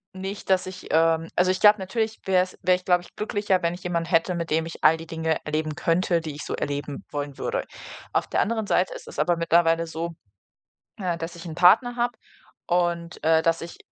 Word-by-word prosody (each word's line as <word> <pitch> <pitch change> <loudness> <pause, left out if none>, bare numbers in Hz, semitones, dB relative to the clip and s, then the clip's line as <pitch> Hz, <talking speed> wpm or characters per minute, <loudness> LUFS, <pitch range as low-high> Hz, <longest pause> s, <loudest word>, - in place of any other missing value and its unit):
nicht, 195 +2 -6
dass 185 -1 +3
ich, 185 0 -9
ähm 165 0 +3
also 185 +1 +3
ich 185 - -2
glaube, 210 0 +7
natürlich 220 +3 -2
wär's 185 -1 +1
wäre 185 - +4
ich, 180 - -7
glaube 180 -1 +3
ich, - - -18
glücklicher, 205 -3 0
wenn 170 0 0
ich 180 - -13
jemanden 170 -1 -2
hätte, 170 +1 +2
mit 170 -1 -3
dem 160 +1 +1
ich 165 - -9
all 160 +1 +6
die 165 - -9
Dinge 160 -1 -1
erleben 155 0 -2
könnte, 170 +2 +1
die 160 -2 -6
ich 145 - -7
so - - -3
erleben 145 0 -4
wollen 145 -2 -4
würde. - - -2 0.5
Auf - - +1
der - - +1
anderen 220 +1 -1
Seite 185 -2 +1
ist - - -10
es - - -8
aber 170 +3 +2
mittlerweile 165 0 +3
so, 165 +1 -5 0.8
äh, 180 -4 -2
dass 165 +1 -5
ich 170 0 -10
'n 165 -2 -7
Partner 230 +8 +5
habe 240 -1 0 0.5
und, 175 -1 -1
äh, 160 0 +4
dass 165 0 +1
ich 170 - -8
170 Hz, 220 wpm, -25 LUFS, 165-185 Hz, 0.8 s, glaube